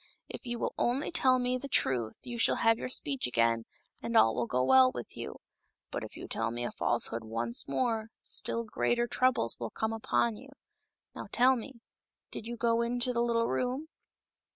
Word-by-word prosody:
If -, -, -9 dB
you 240 Hz, 0 st, -2 dB
will -, -, -2 dB
only 260 Hz, +7 st, +1 dB
tell 260 Hz, -6 st, +5 dB
me 250 Hz, 0 st, 0 dB
the 280 Hz, -, -6 dB
truth 125 Hz, -, +1 dB
you 240 Hz, -1 st, -6 dB
shall -, -, +3 dB
have 225 Hz, 0 st, +3 dB
your -, -, -4 dB
speech 140 Hz, -, -1 dB
again, 115 Hz, -1 st, +1 dB, 0.4 s
and 230 Hz, 0 st, 0 dB
all 115 Hz, -, +6 dB
will 120 Hz, 0 st, -1 dB
go 125 Hz, +2 st, +1 dB
well 130 Hz, 0 st, +6 dB
with 120 Hz, -2 st, -7 dB
you. -, -, -6 dB, 0.6 s
But -, -, -3 dB
if -, -, -9 dB
you -, -, -7 dB
tell 115 Hz, 0 st, -1 dB
me 120 Hz, +1 st, -4 dB
a 120 Hz, -, -2 dB
falsehood 115 Hz, -1 st, 0 dB
once 115 Hz, +1 st, -1 dB
more, 225 Hz, -, 0 dB, 0.2 s
still 230 Hz, -, -2 dB
greater 240 Hz, +2 st, 0 dB
troubles 240 Hz, -, +1 dB
will 115 Hz, -2 st, -3 dB
come 220 Hz, 0 st, -2 dB
upon 225 Hz, 0 st, 0 dB
you. 270 Hz, -, -13 dB, 0.6 s
Now -, -, -7 dB
tell 255 Hz, +2 st, +5 dB
me, 240 Hz, 0 st, -8 dB, 0.5 s
did 225 Hz, -, -7 dB
you 240 Hz, 0 st, -5 dB
go 230 Hz, 0 st, +2 dB
into 245 Hz, +1 st, 0 dB
the 235 Hz, -, +1 dB
little 230 Hz, -1 st, +2 dB
room 260 Hz, +5 st, -2 dB
230 Hz, 195 wpm, -31 LUFS, -, 0.6 s, all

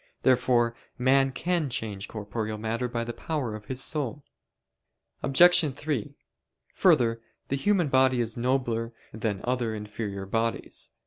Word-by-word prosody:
Therefore 125 Hz, -2 st, +3 dB, 0.2 s
man 135 Hz, +2 st, +3 dB
can 170 Hz, 0 st, -1 dB
change 105 Hz, -5 st, -4 dB
corporeal 110 Hz, 0 st, -4 dB
matter 115 Hz, +3 st, -2 dB
by 115 Hz, -1 st, -2 dB
the 120 Hz, 0 st, -5 dB
power 140 Hz, -8 st, -3 dB
of 105 Hz, -1 st, -8 dB
his 130 Hz, +2 st, -2 dB
soul. 145 Hz, -2 st, -1 dB, 1.0 s
Obj. 155 Hz, 0 st, +5 dB
3: 145 Hz, -7 st, -3 dB, 0.6 s
Further, 115 Hz, -1 st, +3 dB, 0.3 s
the 135 Hz, -, +1 dB
human 180 Hz, +3 st, +2 dB
body 130 Hz, -2 st, +3 dB
is 115 Hz, -2 st, 0 dB
nobler 120 Hz, -2 st, 0 dB, 0.2 s
than 110 Hz, -3 st, -2 dB
other 120 Hz, -3 st, -1 dB
inferior 105 Hz, -2 st, -5 dB
bodies. 115 Hz, +3 st, -2 dB
120 Hz, 130 wpm, -27 LUFS, 110-135 Hz, 1.0 s, Obj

